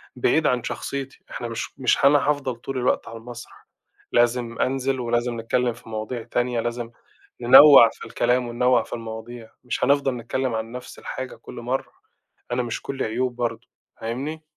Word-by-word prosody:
بعيد 155 +5 +2
عن 125 -2 +1
شخصيتي. 135 +2 -5
إحنا 120 - -5
مش 115 +3 -6
مش 130 +1 +2
هن 140 +1 +7
هافضل 145 -3 +1
طول 130 +3 -6
الوقت 125 0 0
على 115 - -8
المسرح، 120 +1 -11 0.4
لازم 120 -1 +1
أنزل، 135 0 0
ولازم 120 0 -1
نتكلَّم 120 +1 0
في 115 - -15
مواضيع 110 +2 -4
تانية، 120 +1 -1
لازم 120 0 -3 0.5
ننوِّع 130 0 +9
في - - -11
الكلام 125 +1 +1
وننوِّع 120 0 +2
في - - -10
المواضيع، 115 0 -7
مش 125 - -3
هنفضل 140 -2 +2
نتكلَّم 120 +1 -2
عن 110 +1 -4
نفس 125 +1 -9
الحاجة 130 -1 -6
كل - - -12
مرة. 125 +3 -3 0.6
أنا 125 +1 0
مش 120 -1 -4
كلِّي 135 -1 -3
عيوب 120 +3 -1
برضه. 120 -1 -3 0.3
فاهمني؟ 140 +8 -4
120 Hz, 165 wpm, -23 LUFS, 115-130 Hz, 0.6 s, ننوِّع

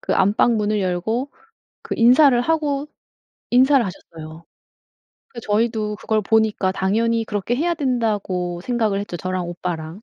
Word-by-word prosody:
그 - - -1
안방 205 +4 +3
문을 210 0 0
열고 210 +9 -2 0.5
그 - - -5
인사를 250 +2 +5
하고 295 -1 -1 0.6
인사를 260 +2 +5
하셨어요. 165 -3 -10 0.8
그러니까 235 - -9
저희도 215 0 -1
그걸 215 0 -1
보니까 215 -2 +1
'당연히 225 +4 0
그렇게 210 +2 -2
해야 340 +5 0
된다.'고 210 - -2
생각을 220 -2 -1
했죠, 200 -3 -6
저랑 185 -1 -3
오빠랑. 175 +1 -6
215 Hz, 315 characters per minute, -21 LUFS, 185-245 Hz, 0.8 s, 인사를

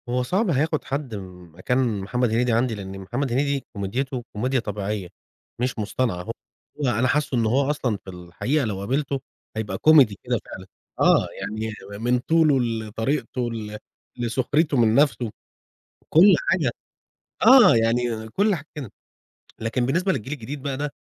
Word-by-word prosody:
هو 125 +1 0
صعب 190 - 0
هياخد 155 +1 +1
حد 135 -4 -4
مكان 95 +5 -2
محمد 125 +5 0
هنيدي 120 +2 +1
عندي، 115 0 +1
لأن 95 -1 -7
محمد 120 +7 -3
هنيدي 140 +2 0
كوميديته 120 +6 -3
كوميديا 130 +5 0
طبيعيّة 105 -3 -4 0.5
مش 125 -2 -1
مصطنعة، 105 -3 -1
هو 115 - -5 0.5
أنا 120 0 +2
حاسه 140 -1 +1
إن 115 - +2
هو 135 +5 +2
أصلًا 125 -7 -1
في 95 - -13
الحقيقة 90 - -2
لو 100 -3 -3
قابلته 135 +6 -1 0.4
هيبقى 110 -1 -3
كوميدي 140 -10 +5
كده 120 -2 0
فعلًا، 95 0 -10 0.3
آه، - - +4
يعني 110 +1 -4 0.3
من 125 +1 +2
طوله، 155 0 +3
لطريقته، 115 +2 -2
ل 105 -2 -6 0.4
لسخريته 135 +5 +1
من 115 -2 +4
نفسه 130 -5 +2 0.8
كل 185 +6 +7
حاجة، - - +2 0.7
آه، 250 - +8
يعني 115 0 0
كل 200 - +2
حاجة 150 - -8 0.7
لكن 115 +2 -1
بالنسبة 180 +8 +1
للجيل 130 +1 -4
الجديد 140 +1 -6
بقى 140 -1 -2
ده 145 +1 -3
125 Hz, 145 wpm, -24 LUFS, 110-140 Hz, 0.8 s, آه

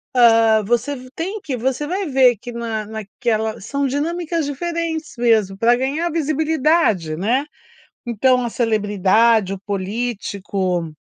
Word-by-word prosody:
hã, 225 -2 +5
você 240 +6 0
ve 255 -1 -11
tem 385 +6 -4
que, 280 -7 -4
você 265 +5 -1
vai 380 +2 -2
ver 255 -5 +4
que 245 +3 -9
na 230 -2 -4
naquela 220 +1 -3
são 280 +6 -2
dinâmicas 330 +3 -2
diferentes 325 +2 -3
mesmo 220 -5 +2
para 235 +3 +4
ganhar 290 +7 -1
visibilidade, 305 - +1
né, 240 - +1 0.6
então 250 +2 +2
a 235 - -1
celebridade, 215 -1 +2
o - - -8
político 195 -4 -3
240 Hz, 130 wpm, -20 LUFS, 215-290 Hz, 0.6 s, hã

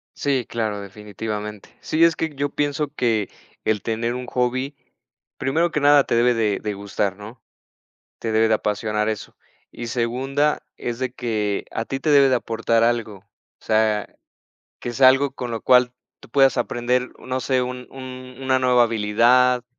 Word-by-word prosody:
Sí, 135 -5 0
claro, 110 -3 -2
definitivamente. 105 +1 -6
Sí, 160 +2 +1
es 165 -1 +5
que 160 -1 -2
yo 145 +1 -1
pienso 145 0 -1
que 115 -7 0 0.3
el 105 -3 0
tener 115 +1 -2
un 125 0 -5
hobby, 130 +3 -1 0.6
primero 165 +5 +1
que 150 - 0
nada, 145 -1 +6
te - - 0
debe 120 +1 +4
de 110 -3 0
de 105 -1 -3
gustar, 100 -1 -2
¿no?, 110 +4 -11 0.8
te 115 - -3
debe 110 +1 +3
de 110 - +3
apasionar 105 +1 -1
eso. 110 - -5 0.4
Y 120 - -7
segunda, 130 +5 0
es 120 -1 -4
de 130 -1 -2
que 105 -5 -2
a 115 - -3
ti 135 - -4
te 155 - -1
debe 140 -2 +6
de 130 - +3
aportar 115 -1 0
algo, 115 -4 0
o 95 - -24 0.4
sea, 110 -1 +2 0.7
que 120 - -4
sea 130 +1 +6
algo 135 +1 +3
con 125 -1 -5
lo 115 -1 -4
cual 125 -1 +4 0.3
tú - - -15
puedas 135 -1 +4
aprender, 125 +1 0
uh, - - -14
no 130 0 -2
sé, 130 -1 +1
un 125 0 -5
un 130 -1 -9
una 130 0 +2
nueva 125 -1 +4
habilidad, 120 +3 +3
120 Hz, 175 wpm, -22 LUFS, 110-130 Hz, 0.8 s, nada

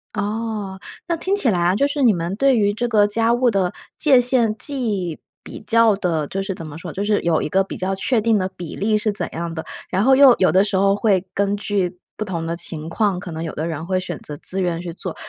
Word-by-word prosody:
哦。 210 -2 -3 0.3
那 340 - 0
听 380 +4 0
起 285 -11 +2
来 180 -5 +1
啊， 175 +2 +2
就 280 - +2
是 285 0 -3
你 235 -4 +5
们 170 +1 -3
对 265 +2 +3
于 205 -1 +2
这 240 +3 -2
个 215 -3 +4
家 225 +2 +2
务 245 0 +2
的 190 -3 0 0.2
界 275 -5 +5
限 240 -3 +2
既 210 - -2 0.2
比 - - -10
较 230 -2 +4
的 170 -6 -1
就 195 - -3
是 195 -1 -4
怎 165 -3 -8
么 145 - -9
说 170 0 -7
就 195 +6 -3
是 205 0 +1
有 165 -2 +1
一 - - -2
个 190 +4 +2
比 195 - -8
较 190 +1 -2
确 235 +5 +1
定 225 -1 +3
的 185 0 -1
比 175 -3 -7
例 215 +2 +1
是 215 0 0
怎 200 - -2
样 170 0 -4
的， 160 - -5 0.3
然 190 +2 +1
后 265 +1 +5
又 270 -2 +8
有 185 - +4
的 190 +1 +4
时 205 - -2
候 195 +1 +3
会 195 -3 +1
根 200 0 0
据 195 -3 -2 0.2
不 215 - -2
同 170 -5 -4
的 165 - -2
情 165 -2 -3
况， 200 +1 0
可 185 -1 -8
能 160 +1 -5
有 165 - -5
的 160 +2 -3
人 160 -1 -4
会 185 +1 0
选 175 -3 -5
择 150 - -8
自 190 +5 -4
愿 175 -2 -1
去 175 - -6
做， 180 -1 -6
195 Hz, 280 characters per minute, -21 LUFS, 175-225 Hz, 0.3 s, 又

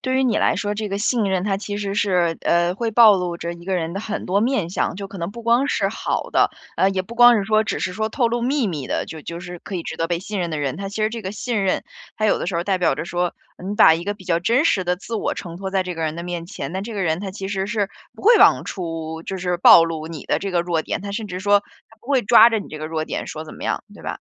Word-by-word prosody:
对 260 0 -1
于 265 - +3
你 240 - +2
来 - - +2
说， 205 0 -2
这 210 0 -3
个 195 - -2
信 225 +1 +1
任 190 -2 0
它 195 -1 0
其 205 0 -5
实 200 -1 -3
是， 180 -5 +1
呃， 170 +1 +2
会 230 +2 -2
暴 220 -2 +7
露 180 -2 -3
着 170 0 -4
一 170 0 -12
个 190 0 -1
人 165 -1 -2
的 195 - -4
很 215 0 -4
多 195 +3 +2
面 220 -8 0
向， - - -1
就 195 +1 -7
可 195 -1 -9
能 170 +2 -3
不 235 +2 -10
光 240 +4 +3
是 - - +1
好 - - -3
的， - - +3 0.3
呃， 190 - +4
也 190 -1 -1
不 230 +5 -11
光 240 0 +7
是 205 - 0
说， 215 +1 +2
只 175 - -3
是 180 +3 -2
说 220 +3 -2
透 235 0 +1
露 240 +1 -1
秘 265 -1 +1
密 150 -6 -4
的， - - -1
就 160 - -8
就 170 +2 -6
是 175 0 -8
可 195 - -8
以 170 - -2
值 - - -6
得 165 - 0
被 170 0 -1
信 205 +1 -5
任 175 -2 -2
的 155 - -3
人。 140 0 -2
它 195 0 -5
其 200 - -8
实 215 - +3
这 230 +1 -6
个 190 0 -5
信 215 -2 -2
任 190 - +1 0.3
它 215 - +1
有 - - +3
的 - - -4
时 180 - -3
候 170 - 0
代 190 0 0
表 180 - +2
着 - - -4
说， 175 0 -2 0.3
你 205 - -2
把 205 -6 +7
一 170 +2 -4
个 205 - -2
比 190 -2 -15
较 170 -2 +1
真 235 - +2
实 190 - +2
的 180 - +1
自 230 +5 -7
我 - - -1
呈 170 -2 -7
托 190 0 -5
在 190 -1 +1
这 180 -1 -5
个 165 - -4
人 155 -1 -1
的 170 - -6
面 175 -1 -5
前， 180 - -6
那 190 - -3
这 220 +3 -6
个 195 - -2
人 160 -1 0
他 195 0 -5
其 195 -1 -6
实 195 -1 -2
是 210 -2 -1 0.3
不 - - -14
会 465 +3 +7
往 - - +6
出 165 -3 -5
就 190 - -4
是 180 -1 -1
暴 170 -1 +8
露 160 -1 -4
你 160 -3 -8
的 - - +1
这 200 - -4
个 175 - +2
弱 175 -2 0
点， - - -3
他 200 +1 -6
甚 215 +1 -4
至 180 -1 -6
说 205 0 +4 0.3
他 225 - -19
不 - - -21
会 270 -3 +2
抓 235 +2 +8
着 225 - +1
你 - - -10
这 155 - -8
个 155 - -5
弱 155 0 -2
点 - - -4
说 155 0 -6
怎 155 - -11
么 - - -11
样， - - -1
对 - - -14
吧？ - - -5
190 Hz, 340 characters per minute, -21 LUFS, 170-215 Hz, 0.3 s, 暴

